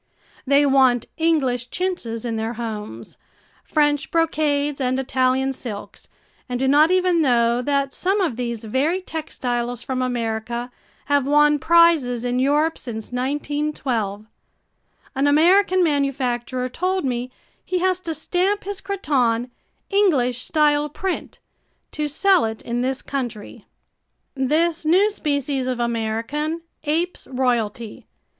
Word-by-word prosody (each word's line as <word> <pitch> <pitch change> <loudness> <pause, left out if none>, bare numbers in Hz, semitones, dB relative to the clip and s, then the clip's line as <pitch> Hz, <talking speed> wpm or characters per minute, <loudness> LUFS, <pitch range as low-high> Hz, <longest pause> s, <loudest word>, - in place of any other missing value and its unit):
They 280 +1 +4
want 260 -3 +4
English 270 -7 +1
chintzes 300 -12 -3
in 230 -1 -2
their 225 +1 -2
homes, 210 - -7 0.4
French 295 -2 +1
brocades 295 -3 0
and 255 0 0
Italian 265 0 +1
silks 220 -6 -8 0.4
and 245 0 -2
do 265 - +1
not 295 +4 +5
even 365 -2 +3
know 240 -3 +2
that 275 +1 0
some 385 +3 0
of 345 - 0
these 235 -2 -4
very 275 - 0
textiles 245 -8 -4
from 255 -1 -2
America 235 0 -3 0.3
have 285 -2 +1
won 295 0 +4
prizes 320 -8 +4
in 245 0 0
Europe 295 +4 +2
since 220 -3 -6
1912. 260 -5 -2 0.9
An 275 0 +1
American 365 +5 +4
manufacturer 260 -4 -1
told 365 +6 -1
me 250 -1 -2 0.3
he 370 - -2
has 370 0 +1
to 330 -3 -4
stamp 370 +6 0
his 400 0 -4
cretonne 250 - 0 0.4
"English 275 - +2
style 295 0 +2
print" 375 +5 -4 0.5
to 300 -1 -2
sell 375 +5 +3
it 220 0 -5
in 240 +1 -2
this 260 +1 -2
country. 240 -7 -5 0.7
This 315 +5 +1
new 375 +7 +4
species 285 -7 -1
of 250 -1 -2
American 235 +8 -2 0.2
apes 335 +4 -1
royalty. 235 -4 -2
275 Hz, 125 wpm, -22 LUFS, 245-315 Hz, 0.9 s, not